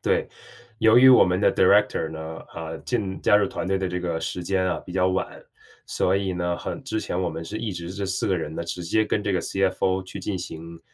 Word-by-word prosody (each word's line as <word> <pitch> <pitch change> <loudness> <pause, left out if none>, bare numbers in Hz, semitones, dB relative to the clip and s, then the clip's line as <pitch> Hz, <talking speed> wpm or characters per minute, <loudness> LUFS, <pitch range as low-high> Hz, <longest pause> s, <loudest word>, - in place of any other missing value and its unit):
对， - - +1 0.5
由 110 +1 +5
于 130 +1 +9
我 125 - +8
们 90 0 +2
的 - - +3
director 80 - +3
呢， 80 0 -7
啊， 80 0 -7
进 100 -6 -3
加 105 - +5
入 105 -1 +3
团 - - -5
队 95 - +2
的 95 - -1
这 90 0 -3
个 85 -2 -2
时 80 +2 -4
间 95 0 0
啊 90 - 0
比 - - -9
较 90 0 +2
晚， 95 0 -2 0.5
所 95 +2 +1
以 95 -1 -1
呢， 90 -1 -1
很 - - -6
之 130 -4 -3
前 90 -3 -3
我 90 - 0
们 80 - -6
是 105 +5 -5
一 110 -2 -3
直 85 -1 -6
是 - - -7
这 100 -1 -3
4 95 0 -1
个 95 - +2
人 80 -1 -5
呢， - - -4
直 90 +1 -5
接 110 +6 +1
跟 105 - -1
这 100 -1 -1
个 90 - 0
CFO 95 0 0
去 95 +2 -9
进 95 0 -3
行， 85 -1 -8
95 Hz, 315 characters per minute, -24 LUFS, 85-100 Hz, 0.5 s, 于